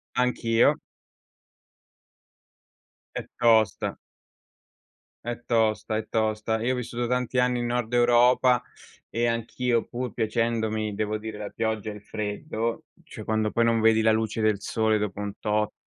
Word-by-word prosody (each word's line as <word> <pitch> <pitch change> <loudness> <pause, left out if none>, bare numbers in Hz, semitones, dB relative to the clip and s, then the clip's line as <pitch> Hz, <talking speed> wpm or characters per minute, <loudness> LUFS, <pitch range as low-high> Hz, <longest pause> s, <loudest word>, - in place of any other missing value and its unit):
Anch'io. 120 -2 +3 2.4
È - - -4
tosta. 110 -3 +3 1.3
È 120 +1 -5
tosta, 110 -1 +1
è 110 0 -4
tosta. 110 0 0
Io 130 +2 +1
ho - - -1
vissuto 120 0 -3
tanti 125 +1 -1
anni 125 0 +2
in 120 - -1
nord 120 -1 -2
Europa 120 +1 +4 0.4
e 120 +1 0
anch'io, 115 +1 0
pur 125 -2 -5
piacendomi 110 -2 -1
devo 110 0 -2
dire 110 -1 -6
la 105 -1 -5
pioggia 110 -1 -2
e - - -7
il 105 - -11
freddo, 110 +3 -4 0.2
cioè - - -10
quando 110 -1 0
poi 115 - +2
non 115 -1 +2
vedi 110 0 +5
la 110 - +4
luce 110 0 -1
del 110 -2 +2
sole 110 +1 +1
dopo 105 -1 -3
un 105 -1 -3
tot, 105 0 0
110 Hz, 145 wpm, -26 LUFS, 110-120 Hz, 2.4 s, vedi